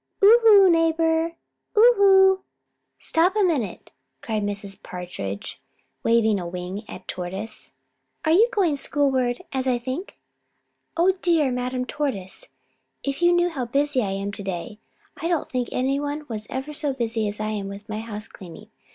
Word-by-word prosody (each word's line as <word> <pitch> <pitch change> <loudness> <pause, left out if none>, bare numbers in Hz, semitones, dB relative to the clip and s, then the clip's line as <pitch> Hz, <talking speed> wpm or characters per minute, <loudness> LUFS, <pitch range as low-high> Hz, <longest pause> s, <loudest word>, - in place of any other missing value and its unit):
"Oho, 430 -2 +8
neighbor, 330 0 +2 0.4
oho! 390 -4 +6 0.5
Stop 350 +5 +2
a 425 - +3
minute!" 300 - -1 0.3
cried 220 -2 -2
Mrs. 200 -1 -4
Partridge, 175 - -6 0.4
waving 220 -3 +3
a 175 - -5
wing 180 +4 -6
at 185 - -10
Tortoise. 190 +5 -5 0.5
"Are 315 - +3
you 430 +8 +5
going 355 -8 +2
schoolward, 265 -4 0
as 265 -1 -1
I 250 -1 +2
think? 260 +10 -6 0.8
Oh, 350 +3 +5
dear 320 -6 +3
Madame 250 0 -2
Tortoise, 225 -11 -3 0.5
if 275 +3 -3
you 345 0 +5
knew 350 0 +3
how 270 -7 -3
busy 275 +2 +1
I 205 - -1
am 195 +1 -3
to 205 - -6
day. 195 +4 -5 0.4
I 330 - -3
don't 340 -3 -1
think 250 -2 -1
any 270 +2 0
one 290 +1 -4
was 215 -2 -5
ever 265 +3 -4
so 290 -2 -1
busy 225 -3 -1
as 205 +1 -5
I 215 0 -2
am 205 -2 -3
with 200 +1 -9
my 215 0 -4
house 220 -1 -6
cleaning. 195 +3 -12
255 Hz, 160 wpm, -24 LUFS, 210-330 Hz, 0.8 s, Oho